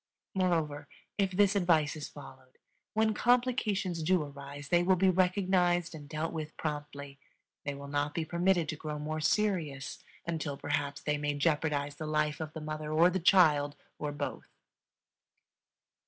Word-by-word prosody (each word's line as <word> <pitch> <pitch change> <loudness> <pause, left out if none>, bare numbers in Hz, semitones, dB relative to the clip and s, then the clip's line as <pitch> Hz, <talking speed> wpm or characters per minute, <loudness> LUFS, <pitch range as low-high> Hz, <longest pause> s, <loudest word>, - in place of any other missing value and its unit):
Moreover, 165 -6 0 0.3
if 195 -1 +3
this 200 +2 +3
advice 165 -6 +3
is 150 - -6
followed, 130 -3 -13 0.4
when 220 0 +3
complications 220 -7 +1
do 175 +1 +2
arise 140 0 -9
they 175 0 +4
will 185 +2 +4
be 190 +1 +4
recognized 180 -2 +2
and 145 -2 -10
dealt 155 +1 -3
with 155 -1 -5
promptly; 145 -2 -5 0.5
they 145 -1 -2
will 140 0 -8
not 145 +1 -1
be 165 - -1
permitted 170 0 +2
to - - -2
grow 150 0 -5
more 155 +1 -3
serious 155 -9 0 0.3
until, 160 -4 -3
perhaps, 145 -1 -2
they 150 -1 0
may 145 0 -1
jeopardize 145 -1 0
the 155 - -5
life 150 -1 0
of 155 -1 -5
the 160 - -6
mother 155 0 -4
or 165 +3 +5
the 190 - 0
child 155 -6 +5 0.2
or 150 -1 -2
both. 145 0 -5
155 Hz, 155 wpm, -31 LUFS, 145-180 Hz, 0.5 s, or